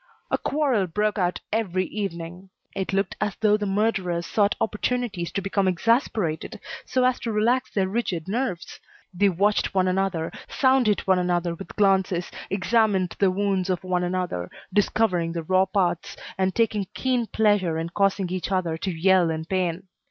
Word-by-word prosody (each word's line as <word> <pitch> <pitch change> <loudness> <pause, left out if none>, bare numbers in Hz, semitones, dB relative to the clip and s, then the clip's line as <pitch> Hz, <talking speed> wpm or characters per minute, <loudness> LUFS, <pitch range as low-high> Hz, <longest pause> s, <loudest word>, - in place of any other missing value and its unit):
A - - +3
quarrel 270 -10 +1
broke 210 +4 0
out 180 -1 0
every 190 -4 0
evening. 180 -2 -5 0.3
It 190 0 -2
looked 195 +1 0
as 205 -3 -1
though 210 -1 +3
the 210 -1 -2
murderers 195 -4 0
sought 205 +4 +2
opportunities 220 -5 -1
to 195 - -2
become 195 0 0
exasperated 185 - 0 0.3
so 255 - +1
as 255 0 +2
to 230 - -3
relax 240 +4 +1
their 195 -2 0
rigid 190 -6 -2
nerves. 200 -5 -3 0.3
They 200 +3 +3
watched 200 +3 +1
one 185 -1 +3
another, 185 -3 0 0.2
sounded 260 -6 +3
one 190 -1 +2
another 175 -1 0
with 190 +3 -10
glances, 190 -3 +2 0.2
examined 195 -2 +1
the 195 - +4
wounds 195 -1 0
of 185 -1 -1
one 180 -1 0
another, 175 - -2 0.2
discovering 190 -5 +1
the 165 -1 -3
raw 185 +3 +3
parts, 185 -4 -1 0.2
and 190 0 0
taking 215 -4 +1
keen 250 -3 0
pleasure 205 -7 +2
in 165 +1 -3
causing 195 0 +1
each 185 +1 -3
other 175 -4 0
to 190 - -2
yell 180 0 +3
in 160 0 -3
pain. 180 0 -1
190 Hz, 165 wpm, -24 LUFS, 180-210 Hz, 0.3 s, the